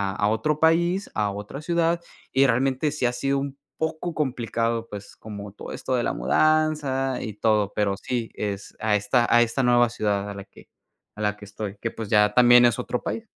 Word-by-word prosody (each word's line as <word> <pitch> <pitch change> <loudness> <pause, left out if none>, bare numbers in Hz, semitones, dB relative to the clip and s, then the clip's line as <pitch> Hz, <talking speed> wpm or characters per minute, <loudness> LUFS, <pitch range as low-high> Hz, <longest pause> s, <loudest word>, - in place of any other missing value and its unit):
a 105 - +1
otro 150 +8 0
país, 170 +4 +2
a 105 -2 0
otra 105 +8 -7
ciudad 170 +1 +1 0.3
y 135 +1 +4
realmente 135 +4 +1
sí 150 -4 -2
ha 120 - +2
sido 135 +3 0
un 140 0 -5 0.2
poco 160 +2 -3
complicado, 115 -5 -1
pues 100 -1 -9
como 105 -2 -8
todo - - -9
esto 130 - -2
de 120 - 0
la - - -1
mudanza 140 - +1
y 110 - -5
todo. 105 -1 +1
Pero 100 -2 0
sí, 120 +2 -3
es 100 -1 -5
a 110 -1 +1
esta 120 +4 +2
a 120 - +7
esta 120 +3 +1
nueva 120 -1 +4
ciudad 105 -3 -1
a - - -5
la 100 0 -8
que - - -18 0.5
a 105 - -8
la 105 0 0
que 105 - -12
estoy, 105 0 -6
que 115 - -2
pues 110 -3 -7
ya 105 -1 +4
también 120 0 +7
es 120 -3 +2
otro 125 - -3
país. 225 - -4
120 Hz, 205 wpm, -24 LUFS, 105-140 Hz, 0.5 s, a